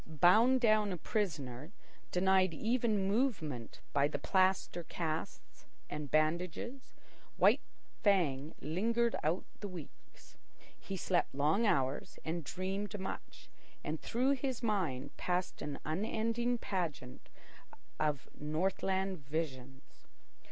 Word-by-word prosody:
Bound 185 Hz, -, +5 dB
down 215 Hz, -3 st, +4 dB
a 180 Hz, -, -2 dB
prisoner, 155 Hz, -, -2 dB, 0.4 s
denied 185 Hz, -1 st, +3 dB
even 220 Hz, -2 st, +1 dB
movement 190 Hz, -, -1 dB
by 140 Hz, 0 st, +4 dB
the 150 Hz, -, -3 dB
plaster 185 Hz, -2 st, +2 dB
casts 160 Hz, -1 st, -5 dB, 0.2 s
and 150 Hz, -1 st, -4 dB
bandages, 170 Hz, -, 0 dB, 0.4 s
White -, -, +5 dB, 0.4 s
Fang 160 Hz, -8 st, +2 dB
lingered 230 Hz, -, +1 dB
out 160 Hz, +5 st, 0 dB
the 205 Hz, -, -4 dB
weeks. 175 Hz, -6 st, -12 dB, 0.4 s
He 195 Hz, -, -6 dB
slept 175 Hz, -4 st, 0 dB
long 155 Hz, +11 st, +3 dB
hours 135 Hz, -6 st, 0 dB
and 165 Hz, +1 st, -2 dB
dreamed 195 Hz, +6 st, -3 dB
much, 190 Hz, -, -6 dB, 0.4 s
and 155 Hz, +1 st, -3 dB
through 255 Hz, +4 st, +1 dB
his 260 Hz, -3 st, -1 dB
mind 180 Hz, -, -1 dB
passed 180 Hz, 0 st, -1 dB
an 145 Hz, -2 st, -3 dB
unending 225 Hz, +8 st, 0 dB
pageant 160 Hz, -, -4 dB, 0.7 s
of 150 Hz, -3 st, 0 dB
Northland 190 Hz, +4 st, -1 dB
visions. 135 Hz, -4 st, -5 dB
180 Hz, 110 wpm, -34 LUFS, 155-210 Hz, 0.7 s, Bound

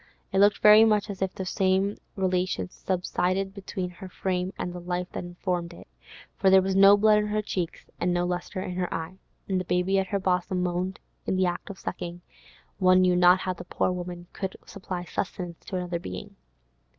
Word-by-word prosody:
It 190 Hz, -, +1 dB
looked 205 Hz, +1 st, +4 dB
very 210 Hz, +1 st, +9 dB
much 210 Hz, -1 st, +2 dB
as 195 Hz, -, -9 dB
if 190 Hz, -1 st, -1 dB
the 190 Hz, -, -4 dB
same 190 Hz, +1 st, +1 dB, 0.2 s
relation 185 Hz, -1 st, -1 dB
subsisted 185 Hz, +1 st, -1 dB
between 190 Hz, -2 st, -5 dB
her 185 Hz, +1 st, -10 dB
frame 185 Hz, 0 st, -2 dB
and 175 Hz, -, -4 dB
the 180 Hz, -, -6 dB
life 180 Hz, 0 st, -3 dB
that -, -, -5 dB
informed 175 Hz, -1 st, -3 dB
it, -, -, -14 dB, 0.5 s
for 190 Hz, -, +3 dB
there 190 Hz, 0 st, +6 dB
was 190 Hz, 0 st, -1 dB
no 195 Hz, +1 st, +8 dB
blood 210 Hz, 0 st, +5 dB
in 210 Hz, -, -1 dB
her 210 Hz, 0 st, -1 dB
cheeks, 180 Hz, -4 st, -4 dB, 0.2 s
no 175 Hz, 0 st, +1 dB
lustre 180 Hz, +2 st, -3 dB
in 180 Hz, -, -4 dB
her 180 Hz, -1 st, -1 dB
eye. 165 Hz, +4 st, -5 dB, 0.3 s
The 185 Hz, -2 st, -1 dB
baby 180 Hz, +2 st, +1 dB
at 190 Hz, -, -1 dB
her 200 Hz, -, 0 dB
bosom 180 Hz, 0 st, 0 dB
moaned 180 Hz, +1 st, -2 dB, 0.3 s
in -, -, +1 dB
the 185 Hz, 0 st, +2 dB
act 175 Hz, +3 st, -3 dB
of 200 Hz, -, -7 dB
sucking; 175 Hz, 0 st, -6 dB, 0.6 s
one 185 Hz, 0 st, +5 dB
knew 180 Hz, -1 st, +4 dB
not 180 Hz, +1 st, +6 dB
how 185 Hz, -, -1 dB
the 175 Hz, -, -9 dB
poor 180 Hz, -, 0 dB
woman 175 Hz, -1 st, -5 dB
could 190 Hz, -1 st, -4 dB
supply 185 Hz, -3 st, -6 dB
sustenance 180 Hz, -1 st, -5 dB
to -, -, -5 dB
another 180 Hz, -1 st, -2 dB
being. 90 Hz, -, -8 dB
185 Hz, 200 wpm, -27 LUFS, 180-195 Hz, 0.6 s, very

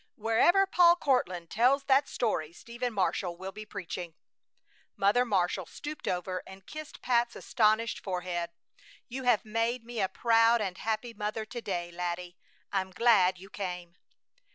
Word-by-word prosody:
Wherever 230 Hz, -, +4 dB
Paul 350 Hz, -2 st, +6 dB
Courtland 185 Hz, -, 0 dB
tells 260 Hz, +5 st, +3 dB
that 275 Hz, +1 st, +3 dB
story 165 Hz, -10 st, -1 dB
Stephen 240 Hz, +6 st, -5 dB
Marshall 185 Hz, -3 st, -1 dB
will 190 Hz, +2 st, -6 dB
be 215 Hz, +1 st, -9 dB
preaching." 180 Hz, -4 st, -6 dB, 0.8 s
Mother 205 Hz, +5 st, +4 dB
Marshall 190 Hz, -4 st, 0 dB
stooped 300 Hz, +1 st, -7 dB
over 185 Hz, 0 st, -2 dB
and 190 Hz, 0 st, -12 dB
kissed 310 Hz, -1 st, -9 dB
Pat's 240 Hz, -1 st, +2 dB
astonished 220 Hz, -1 st, +1 dB
forehead. 180 Hz, -2 st, -3 dB, 0.6 s
"You 260 Hz, +1 st, -6 dB
have 240 Hz, -4 st, +3 dB
made 230 Hz, +2 st, -1 dB
me 235 Hz, -2 st, -4 dB
a 190 Hz, -, +1 dB
proud 230 Hz, 0 st, +4 dB
and 190 Hz, -4 st, -3 dB
happy 225 Hz, +2 st, -2 dB
mother 215 Hz, +1 st, -3 dB
to 240 Hz, +2 st, -7 dB
day, 175 Hz, -4 st, -3 dB
laddie! 175 Hz, 0 st, -4 dB, 0.4 s
I'm 190 Hz, -1 st, -1 dB
glad 190 Hz, -2 st, +4 dB
you 195 Hz, +3 st, -13 dB
came." 180 Hz, -3 st, -5 dB
215 Hz, 150 wpm, -30 LUFS, 180-240 Hz, 0.8 s, Paul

